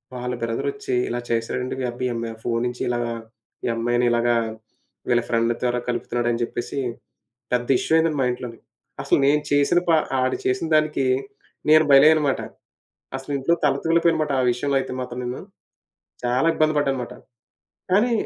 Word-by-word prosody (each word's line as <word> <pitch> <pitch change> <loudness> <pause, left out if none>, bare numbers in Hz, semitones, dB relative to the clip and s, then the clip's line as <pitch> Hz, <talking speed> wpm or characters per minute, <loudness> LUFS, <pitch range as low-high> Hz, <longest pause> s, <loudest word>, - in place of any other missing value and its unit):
వాళ్ళ 125 0 -3
బ్రదరొచ్చి 140 - -3 0.2
ఇలా 120 - -2
చేశాడండి." 120 +2 -1
మీ - - -1
అబ్బి 125 +1 -4
ఈ - - -2
అమ్మాయి 115 -1 -4
ఫోను 115 -1 0
నుంచి 125 0 -6
ఇలాగా 120 -1 -1 0.5
ఈ - - 0
అమ్మాయిని 120 +1 +1
ఇలాగ 120 0 +1 0.8
వీళ్ళ 120 0 +3
ఫ్రెండ్ 115 0 +2
ద్వారా 125 0 +1
కలుపుతున్నాడు" 120 0 -1
అని 120 0 -2
చెప్పేసి 120 +3 -4 0.7
పెద్ద 120 -1 0
ఇష్యూ - - -1
అయిందండి 160 -2 +1
మా - - +2
ఇంట్లోని. 125 -2 -7 0.4
అసలు - - +2
నేను 150 +1 +3
చేసిన 145 +5 +4
ప - - +6 0.3
ఆడు 130 0 0
చేసిందానికి 155 +1 +1 0.6
నేను 155 +1 +7
బలియ్యన్నమాట. 145 0 +5 0.8
అసలింట్లో 135 +3 -1
తల 140 -2 +3
తూలిపోయాననమాట 165 -2 +2
ఆ - - +1
విషయంలో 140 +3 -1
అయితే 130 - -4
మాత్రం 125 -1 -5
నేను, 125 +1 -4 0.9
చాలా 125 +5 +1
ఇబ్బంది 155 0 +2
పడ్డాననమాట. 135 -4 -1 0.8
కానీ 220 +6 +3
125 Hz, 150 wpm, -23 LUFS, 120-150 Hz, 0.9 s, నేను